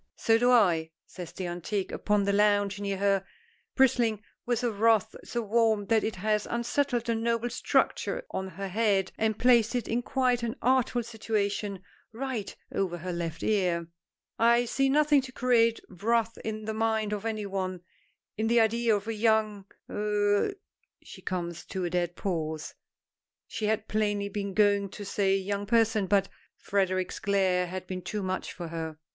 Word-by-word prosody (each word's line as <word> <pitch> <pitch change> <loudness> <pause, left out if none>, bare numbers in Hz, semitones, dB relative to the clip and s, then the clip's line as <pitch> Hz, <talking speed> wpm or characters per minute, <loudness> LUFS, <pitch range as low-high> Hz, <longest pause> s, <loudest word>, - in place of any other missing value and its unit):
"So 225 0 +3
do 245 +1 +3
I," 175 -10 +4 0.2
says 180 -3 -9
the 185 - -5
antique 175 +3 -3
upon 210 -1 +1
the 200 0 +1
lounge 205 -1 +2
near 200 -1 -2
her, 195 -1 +2 0.5
bristling 235 -5 +3 0.2
with 245 0 0
a 240 - +1
wrath 220 0 +2
so 235 -1 -3
warm 220 -1 +2
that 225 -1 +3
it 220 - -2
has 210 +2 0
unsettled 240 +1 0
the 235 - +1
noble 230 +1 -1
structure - - 0
on 190 - -3
her 195 +1 -6
head, 195 -1 +1
and 220 -1 +1
placed 240 -1 +4
it 240 -3 -1
in 235 +2 0
quite 250 -1 +1
an 235 +1 -2
artful 250 -1 +2
situation, 210 -3 -2 0.3
right 235 -3 -4 0.2
over 180 -3 -1
her 180 +2 -5
left 165 -1 -4
ear. 180 -5 +1 0.5
"I 235 +1 +4
see 270 +3 +1
nothing 295 0 +4
to 255 0 -9
create 235 -3 +3
wrath 225 +4 0
in 215 -1 -4
the 220 - -2
mind 220 -1 0
of 205 -1 -3
any 220 -2 -2
one, 185 -2 -3 0.6
in 220 +1 0
the 235 +1 +4
idea 230 0 +3
of 205 +1 -4
a 225 - -1
young 215 -2 +1 0.2
er 210 - +1 0.2
" - - -36
She - - -12
comes 175 -2 -4
to 190 -2 -3
a 175 - -3
dead 175 -1 -1
pause; 160 -5 -3 0.7
she 215 - -4
had 220 0 0
plainly 205 -1 0
been 200 -1 -4
going 205 -2 +3
to 205 +2 -8
say 195 0 +1
young 200 +1 -3
person 225 -3 +2
but 195 0 +3 0.3
Frederic's 185 -2 -1
glare 190 -2 +1
had 185 +1 -6
been 185 0 -5
too 205 +3 -4
much 185 0 -3
for 170 -2 -7
her. 160 -1 -5
210 Hz, 175 wpm, -28 LUFS, 190-230 Hz, 0.7 s, I